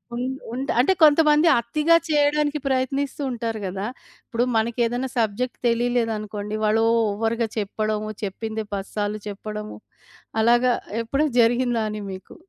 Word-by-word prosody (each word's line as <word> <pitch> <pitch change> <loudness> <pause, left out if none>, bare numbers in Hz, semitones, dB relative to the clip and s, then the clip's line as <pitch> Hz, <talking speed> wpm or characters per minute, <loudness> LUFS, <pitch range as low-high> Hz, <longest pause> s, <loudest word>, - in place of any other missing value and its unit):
ఉండ్ 255 +2 -2 0.2
ఉంట్ 265 +3 -2
అంటే 275 +10 +4
కొంతమంది 300 +1 +6
అతిగా 300 +8 +2
చేయడానికి 295 0 +2
ప్రయత్నిస్తూ 270 +2 -1
ఉంటారు 230 -2 -3
గదా! 190 +2 -3 0.4
ఇప్పుడు 240 0 0
మనకేదన్నా 235 +3 0
సబ్జెక్టు 230 +3 -1
తెలియలేదనుకోండి, 225 -3 -1
వాళ్ళు 220 +1 +3 0.3
ఓవర్‌గా 225 +2 -1
చెప్పడము. 215 +1 -2
చెప్పిందే 220 +2 -4
పది 195 0 -5
సార్లు 210 0 -2
చెప్పడము. 210 +1 -6 0.6
అలాగా 240 +2 +4 0.3
ఎప్పుడనా 275 +6 0
జరిగిందా 240 0 +2
అని 210 0 -5
మీకు? 190 0 -10
230 Hz, 120 wpm, -23 LUFS, 215-260 Hz, 0.6 s, కొంతమంది